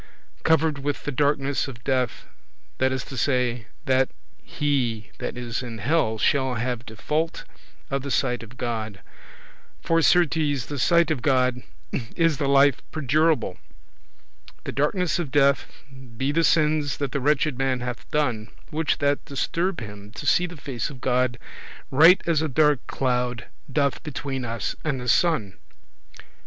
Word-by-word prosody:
Covered 160 -2 +2
with 145 +1 -3
the 145 - -2
darkness 140 0 +1
of 120 -3 -10
death; 130 -3 -1 0.5
that 130 0 +3
is 130 0 -2
to 135 - -8
say, 125 -3 0 0.2
that 130 0 +3 0.3
he 125 -7 -1
that - - -4
is 120 -1 -3
in 120 -3 -6
hell 115 -2 +1
shall 130 +2 +1
have 120 0 -3
default 150 +9 -2 0.5
of 135 0 0
the 140 - -5
sight 125 -1 0
of 115 +2 -12
God; 110 -5 -4 0.8
for 165 0 +2
certes 155 -6 +3
the 145 -2 -5
sight 170 +3 +4
of 145 -6 -1
God 125 -1 +2 0.5
is 165 -3 +2
the 140 - 0
life 140 -1 +4
perdurable 155 - +1
[everlasting]. 65 +1 -27
The - - -4
darkness 155 +3 0
of 165 -5 -2
death, 140 0 +3 0.5
be 135 +3 0
the 165 +3 +2
sins 150 -3 +2
that 140 -3 -2
the 140 - -2
wretched 150 +1 +2
man 130 -2 0
hath 120 -1 -5
done, 120 -8 0 0.2
which 155 0 0
that 145 -2 +1
disturb 170 +6 -1
[prevent] 105 -3 -6
him 100 0 -13
to - - -7
see 180 0 +3
the 175 -1 -10
face 135 -2 -4
of 140 -4 -10
God, 125 -1 +1 0.5
right 165 +7 +7
as 165 -3 +2
a 160 - 0
dark 150 -1 +2
cloud 125 -2 -1 0.3
doth 140 0 +1
between 135 -3 -4
us 115 -2 -3
and 140 -4 -1
the 125 - -6
sun. 115 - +2
135 Hz, 160 wpm, -24 LUFS, 125-150 Hz, 0.8 s, right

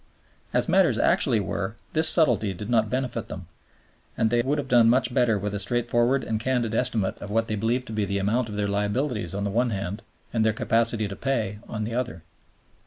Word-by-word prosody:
As - - +1
matters - - +3
actually 110 - +3
were, 100 +1 -3 0.2
this 160 0 +3
subtlety 115 - +2
did 105 +6 -6
not 110 -2 +2
benefit 125 -4 -2
them, 95 - -7 0.7
and 110 -1 +2
they 120 0 +3
would 140 +5 0
have 140 -2 -3
done 120 -3 +5
much 125 0 +2
better 115 -4 +3
with 100 +1 -3
a 100 - -2
straightforward 120 +4 +1
and 110 -1 -2
candid 120 -2 -1
estimate 115 -5 0
of 100 - -7
what 115 +2 0
they 110 - -1
believed 115 +4 0
to 110 - -7
be 105 -1 0
the 100 0 -2
amount 110 +4 0
of 105 - -6
their 105 0 0
liabilities 105 - -1
on 100 - -2
the 100 - -1
one 120 +4 +1
hand, 100 -1 -4 0.3
and 115 -2 +2
their 110 0 +2
capacity 115 0 +1
to 100 - -6
pay 110 -5 -2
on 110 -1 -4
the 115 +2 -4
other. 120 -9 -3
115 Hz, 215 wpm, -25 LUFS, 105-120 Hz, 0.7 s, done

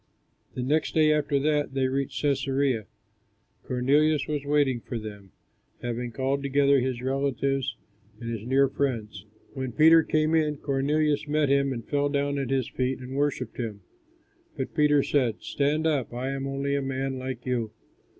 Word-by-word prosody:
The 125 - -2
next 150 +5 0
day 155 -1 +5
after 150 -1 +1
that, 150 -2 0
they 130 -1 +2
reached 135 +2 -2
Cæsarea. 135 -4 +1 0.8
Cornelius 145 +4 +2
was 150 -2 -2
waiting 140 -4 +2
for 120 - -5
them, 105 -3 -9 0.5
having 120 0 -3
called 135 +3 -1
together 140 0 +3
his 125 -1 -2
relatives 135 -1 -1 0.4
and 115 - -7
his 115 -3 -4
near 135 +2 +4
friends. 115 -8 -3 0.3
When 130 -3 -4
Peter 160 +3 +7
came 155 0 +1
in, 155 -2 +2
Cornelius 145 +2 0
met 150 -1 +1
him 140 0 +3
and 115 -3 -5
fell 145 0 +1
down 140 0 0
at 135 -3 -3
his 135 -3 0
feet 130 0 -1
and 130 +1 -8
worshipped 140 -4 -1
him. 110 -4 -4 0.8
But - - -4
Peter 150 -2 +4
said, 125 -6 +1
"Stand 150 +3 0
up, 145 -6 0
I 130 +2 -2
am 135 0 -3
only 140 +1 -2
a 140 - 0
man, 135 0 -3
like 130 -2 -5
you." 120 -3 -1
135 Hz, 165 wpm, -26 LUFS, 125-145 Hz, 0.8 s, Peter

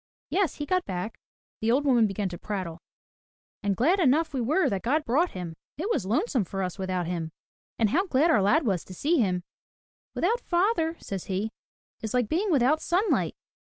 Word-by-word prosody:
"Yes, 385 -3 +1
he 295 - -4
got 365 +4 +1
back," 185 +4 -4 0.4
the 220 - 0
old 270 +5 +3
woman 240 -5 +5
began 195 0 -2
to 175 - -8
prattle. 185 -5 -4 0.8
"And 200 -1 0
glad 340 +11 +3
enough 315 0 +3
we 260 - -1
were 305 +11 +2
that 195 -2 -1
God 295 +6 +1
brought 310 +10 +2
him. 180 -3 -5 0.2
It 380 +9 -2
was 190 - 0
lonesome 250 - +1
for 195 +2 -3
us 180 +1 -4
without 185 -2 -1
him. 165 -2 -3 0.5
And 220 -3 +2
how 375 +5 +2
glad 315 +2 +3
our 215 - +4
lad 280 +11 +3
was 190 -6 0
to 185 - -10
see 310 - +2
him. 180 -5 +1 0.7
*With - - -3
out 460 +7 +2
father,* 345 -4 +1
says 195 -3 -5
he, 200 +3 -2 0.5
*is 220 +2 -3
like 245 -4 +1
being 380 +6 +1
without 295 0 +3
sunlight.' 375 +6 +1
245 Hz, 195 wpm, -27 LUFS, -, 0.8 s, woman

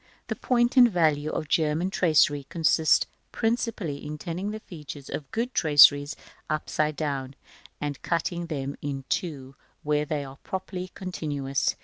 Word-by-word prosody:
The - - -1
point 240 0 +1
and 245 -1 +9
value 155 -5 +2
of - - -2
the - - -16
German 160 +4 +1
tracery 155 -6 +3
consists 160 -1 +3 0.3
principally 225 - -1
in 150 +1 -5
turning 175 +5 -4
the 215 +1 -5
features 150 -7 -10
of 140 - -5
good 240 +3 -2
traceries 145 -1 +6 0.3
upside 155 0 0
down, 140 -3 -3 0.4
and 145 -1 -4
cutting 170 0 -1
them 140 -3 -3
in 140 -2 -4
two 135 -6 -3 0.3
where 150 0 +1
they 145 -1 -2
are 135 0 -11
properly 185 0 -5
continuous. 145 -7 -2
155 Hz, 145 wpm, -26 LUFS, 145-180 Hz, 0.4 s, and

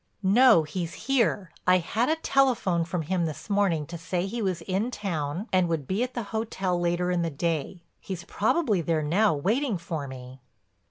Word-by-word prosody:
"No—he's 190 -6 +4
here. 230 - +1 0.2
I 185 0 +6
had 220 - 0
a 315 - +3
telephone 250 - +2
from 170 -1 -3
him 175 +1 0
this 155 +6 -7
morning 190 -7 +2
to 170 +2 -8
say 180 +1 -2
he 230 +4 -4
was 185 -5 -1
in 195 +7 -1
town 175 - -3
and 185 -2 +3
would 160 -4 -1
be 190 - -1
at 250 0 -2
the 240 - -2
hotel 195 -5 -1
later 175 +1 0
in 175 -1 +1
the 165 - 0
day. 165 +3 -3 0.2
He's 185 -3 -6
probably 220 - +1
there 160 -1 0
now, 185 +5 +3
waiting 220 - 0
for 160 -4 -5
me." 130 0 -10
180 Hz, 180 wpm, -27 LUFS, 165-215 Hz, 0.2 s, I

